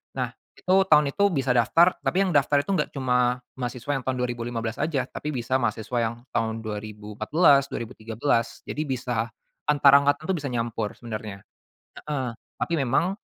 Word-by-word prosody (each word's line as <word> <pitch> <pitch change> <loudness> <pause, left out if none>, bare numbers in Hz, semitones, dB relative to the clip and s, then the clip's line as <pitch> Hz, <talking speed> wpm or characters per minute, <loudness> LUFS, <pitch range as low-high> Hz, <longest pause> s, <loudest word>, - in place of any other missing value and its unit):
Nah, - - -2 0.2
itu 185 - +1
tahun 150 -3 +5
itu 200 +5 +3
bisa 135 -8 0
daftar, 125 +9 +5
tapi 195 +2 +1
yang 185 - 0
daftar 145 0 +3
itu 195 - -4
nggak 160 -6 +1
cuma 125 -1 +1 0.2
mahasiswa 125 +2 -3
yang 130 - -11
tahun 130 - +1
2015 120 -1 -3
aja, 145 -5 0
tapi 150 -2 -4
bisa 130 +2 0
mahasiswa 115 +1 -2
yang 115 0 0 0.2
tahun 115 -1 -1
2014, 110 - +2
2013. 115 +2 -2
Jadi 155 0 -4
bisa 125 -3 -1 0.4
antar 145 -1 +6
angkatan 145 +1 +1
itu - - +1
bisa 140 - -4
nyampur, 115 -3 -2
sebenarnya. 110 -4 -7 0.6
Heeh. 130 -5 -3 0.2
Tapi 170 - -2
memang, 170 +9 +1
125 Hz, 160 wpm, -25 LUFS, 115-145 Hz, 0.6 s, antar